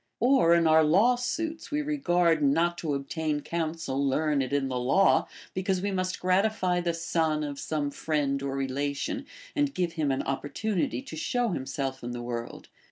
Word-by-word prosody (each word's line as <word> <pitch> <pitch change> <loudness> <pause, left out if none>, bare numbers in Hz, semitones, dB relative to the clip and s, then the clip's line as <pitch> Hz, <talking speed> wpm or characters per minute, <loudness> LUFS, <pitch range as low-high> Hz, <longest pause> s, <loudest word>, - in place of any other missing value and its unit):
Or, 245 -9 +5
in 170 -1 +3
our 160 0 +6
laAvsuits, 245 - +1
we 300 0 -1
regard 175 - +2
not 165 +5 +2
to 150 -4 -1
obtain 150 +2 -2
counsel 160 -4 -2
learned 140 -1 +1
in 140 -1 +1
the 130 - -4
laAv, 130 +10 +3 0.3
be 185 - -2
cause 190 0 0
we 200 +2 -2
must 185 -1 -2
gratify 185 -1 +1
the 175 -1 0
son 160 -2 0
of 145 -1 -5
some 150 -2 -2
friend 140 -3 -1
or 135 -1 -3
relation, 140 - -2 0.3
and 290 -2 0
give 175 -2 -1
him 155 -4 0
an 135 - 0
opportunity 145 - -2
to - - -8
show 240 +9 0
himself 135 -5 -3
in 120 0 -4
the 120 - -5
Avorld. 120 -1 -5
160 Hz, 170 wpm, -28 LUFS, 140-185 Hz, 0.3 s, our